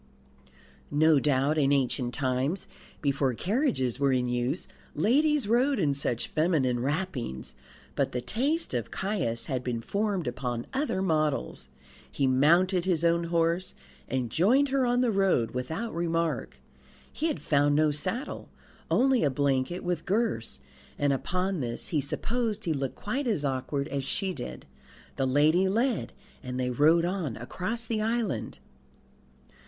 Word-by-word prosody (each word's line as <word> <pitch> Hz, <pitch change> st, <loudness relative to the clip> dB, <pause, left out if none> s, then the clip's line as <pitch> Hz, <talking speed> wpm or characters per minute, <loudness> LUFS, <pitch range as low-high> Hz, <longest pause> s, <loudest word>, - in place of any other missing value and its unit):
No 155 Hz, 0 st, +4 dB
doubt 145 Hz, +2 st, +2 dB
in 140 Hz, -1 st, +3 dB
ancient 130 Hz, -2 st, +1 dB
times, 135 Hz, +5 st, -1 dB, 0.4 s
before 135 Hz, -3 st, +1 dB
carriages 185 Hz, -, 0 dB
were 140 Hz, -1 st, +3 dB
in 125 Hz, -1 st, +1 dB
use, 125 Hz, +7 st, -1 dB, 0.3 s
ladies 290 Hz, +3 st, +2 dB
rode 255 Hz, +5 st, +3 dB
in 150 Hz, -7 st, +2 dB
such 125 Hz, -4 st, -1 dB
feminine 155 Hz, -7 st, +1 dB
wrappings; 130 Hz, -, -3 dB, 0.4 s
but -, -, 0 dB
the 125 Hz, -, -2 dB
taste 270 Hz, -, -1 dB
of 120 Hz, -3 st, -2 dB
Caius 185 Hz, -, -1 dB
had 130 Hz, -3 st, -2 dB
been 120 Hz, -2 st, -2 dB
formed 200 Hz, -, -1 dB
upon 120 Hz, -1 st, -3 dB
other 265 Hz, -9 st, 0 dB
models. 155 Hz, -, -1 dB, 0.4 s
He 140 Hz, -, 0 dB
mounted 170 Hz, +8 st, +4 dB
his 170 Hz, -3 st, +1 dB
own 170 Hz, 0 st, +2 dB
horse 170 Hz, +2 st, 0 dB, 0.3 s
and 125 Hz, -3 st, -2 dB
joined 255 Hz, -, +3 dB
her 265 Hz, -2 st, +2 dB
on 245 Hz, +1 st, +2 dB
the 245 Hz, -2 st, +2 dB
road 190 Hz, -, +2 dB
without 160 Hz, -, -4 dB
remark. 165 Hz, -1 st, -1 dB, 0.5 s
He 315 Hz, -, -1 dB
had 310 Hz, -, -2 dB
found 145 Hz, -1 st, +3 dB
no 155 Hz, 0 st, +3 dB
saddle, 225 Hz, -, -3 dB, 0.4 s
only 260 Hz, -1 st, +3 dB
a 145 Hz, -, +3 dB
blanket 135 Hz, +4 st, 0 dB
with 175 Hz, -2 st, -2 dB
girths, 190 Hz, -, -1 dB, 0.4 s
and 145 Hz, -1 st, +2 dB
upon 180 Hz, +6 st, -1 dB
this 120 Hz, -3 st, -3 dB
he 155 Hz, -6 st, +1 dB
supposed 220 Hz, -, -2 dB
he 165 Hz, -, 0 dB
looked 135 Hz, -2 st, -3 dB
quite 255 Hz, +6 st, -3 dB
as 185 Hz, -11 st, 0 dB
awkward 140 Hz, +1 st, -2 dB
as 140 Hz, 0 st, -2 dB
she 185 Hz, +8 st, -2 dB
did. 125 Hz, -7 st, -7 dB, 0.5 s
The 135 Hz, -, +1 dB
lady 155 Hz, +8 st, +3 dB
led, 235 Hz, +4 st, 0 dB, 0.3 s
and 125 Hz, 0 st, -5 dB
they 125 Hz, 0 st, 0 dB
rode 160 Hz, +6 st, +4 dB
on 175 Hz, -, -2 dB
across 190 Hz, -, -3 dB
the 220 Hz, -1 st, -1 dB
island. 220 Hz, -, -1 dB
155 Hz, 150 wpm, -28 LUFS, 130-200 Hz, 0.5 s, No